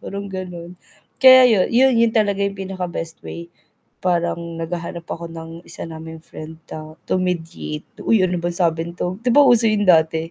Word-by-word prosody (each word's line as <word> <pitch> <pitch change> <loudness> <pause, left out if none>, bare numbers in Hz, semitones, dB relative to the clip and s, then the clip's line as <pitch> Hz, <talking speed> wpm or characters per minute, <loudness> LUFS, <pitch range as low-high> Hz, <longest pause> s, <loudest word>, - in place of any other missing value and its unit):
parang 200 0 -6
gano'n. 180 -2 -7 0.5
Kaya 260 -1 +9
yu 220 -5 +3
yu 255 +3 +5
yun 230 -1 +4
talaga 205 -2 +1
yung 200 0 -3
pinaka 190 -1 -5
best 165 -1 -6
way. 170 0 -8 0.5
Parang 170 -1 -1
naghahanap 170 0 -5
ako 170 0 -5
ng 165 0 -8 0.2
isa - - -9
naming 160 0 -9
friend 160 0 -10
ta 155 0 -9
to - - +1
mediate, 165 -4 -4 0.2
"Uy, 220 -4 +3
ano 180 -1 0
bang 175 0 -3
sabi 165 -2 0
nito?" 180 +2 -4
'Di 245 - +2
ba, 290 - +8
uso 240 -3 +5
yung 215 -1 +1
dati 160 -1 +3
175 Hz, 180 wpm, -20 LUFS, 165-200 Hz, 0.5 s, Kaya